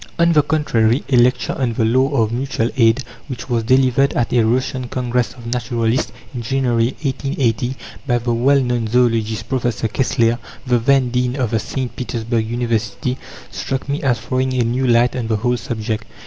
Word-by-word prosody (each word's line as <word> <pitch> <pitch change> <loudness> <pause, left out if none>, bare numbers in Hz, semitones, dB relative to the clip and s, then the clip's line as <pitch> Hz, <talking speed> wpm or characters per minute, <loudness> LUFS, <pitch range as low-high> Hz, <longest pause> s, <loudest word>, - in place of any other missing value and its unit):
On 170 0 +4
the 150 - +6
contrary, 130 -6 +1
a 135 - +3
lecture 125 +1 +3
"On 125 -3 0
the 110 - +1
Law 130 +4 +3 0.2
of 110 - -2
Mutual 120 -1 -1
Aid," 115 +1 +3 0.2
which 130 -2 -7
was 120 -1 +2
delivered 130 +3 +3
at 120 - -1
a 120 - +4
Russian 125 +2 0
Congress 125 -1 -1
of 120 -2 -12
Naturalists, 115 0 -1 0.2
in 125 - -4
January 120 -1 0
1880, 130 -3 -1 0.3
by 120 -2 +2
the 120 0 -1
well 135 +4 +3
known 120 -3 -1
zoologist, 115 -2 +1
Professor 120 -4 -1
Kessler, 120 -1 +1 0.3
the 125 -2 +2
then 130 +1 +2
Dean 125 0 0
of 125 -6 -1
the 115 - +1
St. 130 +3 -4
Petersburg 115 -2 -2
University, 120 +1 -2 0.3
struck 135 0 -4
me 140 +1 -2
as 125 -5 +1
throwing 130 +2 -1
a 125 - +2
new 125 +3 0
light 120 +1 +3
on 120 -3 -2
the 110 - +1
whole 120 +3 +1
subject. 110 -2 -4
120 Hz, 180 wpm, -19 LUFS, 115-130 Hz, 0.3 s, the